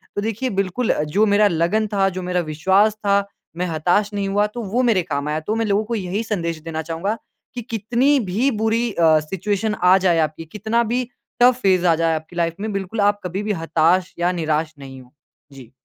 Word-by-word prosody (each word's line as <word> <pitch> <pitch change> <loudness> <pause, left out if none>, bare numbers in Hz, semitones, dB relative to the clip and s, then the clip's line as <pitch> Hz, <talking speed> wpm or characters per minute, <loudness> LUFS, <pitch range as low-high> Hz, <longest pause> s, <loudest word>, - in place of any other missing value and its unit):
तो 205 - -1
देखिए 225 +4 -2
बिल्कुल 195 +4 -1
अ, - - +1
जो 175 +9 +2
मेरा 205 0 +4
लगन 185 +5 +1
था, 195 -1 +3
जो 185 0 -6
मेरा 180 0 -1
विश्वास 190 +7 +3
था, 200 0 +2 0.3
मैं 180 - -1
हताश 175 +6 +1
नहीं 200 -1 -2
हुआ, 205 +1 +2
तो 235 +3 -7
वो 225 +5 0
मेरे 225 -6 +3
काम 150 -3 -3
आया। 155 +1 -1
तो 210 +8 -3
मैं 225 0 0
लोगों 205 0 +1
को 235 +2 -3
यही 200 +1 -2
संदेश 170 -7 -3
देना 160 -1 -4
चाहूँगा 165 +7 -3 0.4
कि 245 - -4
कितनी 240 +5 +1
भी 235 +9 +2
बुरी 225 +2 +1
अ, 160 -4 +4
सिचुएशन 200 +6 -2
आ 180 +1 +6
जाए 180 -3 +2
आपकी, 155 +1 -2
कितना 220 +7 -1
भी 250 +1 +1 0.4
टफ़ 250 0 +6
फ़ेज़ 185 -2 +3
आ 165 - +4
जाए 165 0 +1
आपकी 160 +2 -8
लाइफ़ 170 -1 0
में, 215 +1 -3
बिल्कुल 195 +2 -3
आप 205 0 +2
कभी 185 +3 -3
भी 210 - -1
हताश 165 +3 +2
या 175 +1 +2
निराश 160 -2 -1
नहीं 135 -1 -10
हों। 125 -1 -19 0.4
जी। 130 -4 -13
190 Hz, 215 wpm, -21 LUFS, 165-215 Hz, 0.4 s, आ